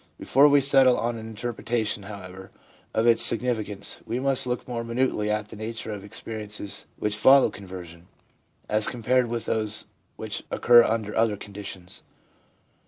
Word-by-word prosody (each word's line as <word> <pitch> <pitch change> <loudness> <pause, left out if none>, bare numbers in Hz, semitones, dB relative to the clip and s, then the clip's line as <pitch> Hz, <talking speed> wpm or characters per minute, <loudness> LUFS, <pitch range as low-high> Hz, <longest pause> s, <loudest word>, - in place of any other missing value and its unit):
Before 140 +3 +4
we 145 -1 +5
settle 135 -2 +4
on 120 0 -2
an 110 - -8
interpretation, 115 -1 -3
however, 95 -2 -10 0.4
of 110 - 0
its 115 -1 +6
significance, 110 -4 +1
we 115 +3 -3
must 135 -1 0
look 125 0 -3
more 120 -2 -4
minutely 115 -3 -1
at 105 0 -2
the - - -10
nature 110 +1 -6
of 100 - -7
the 100 - -12
experi 110 0 -6
ences 105 -1 -6
which 105 0 -1
follow 130 +2 +5
conversion, 90 -4 -10 0.6
as 105 0 +2
compared 125 +1 +1
with 115 -1 -3
those 110 -1 -1 0.3
which - - -5
occur 120 0 +6
under 110 -2 -2
other 110 -2 +2
conditions. 100 -3 -9
110 Hz, 160 wpm, -25 LUFS, 105-120 Hz, 0.6 s, its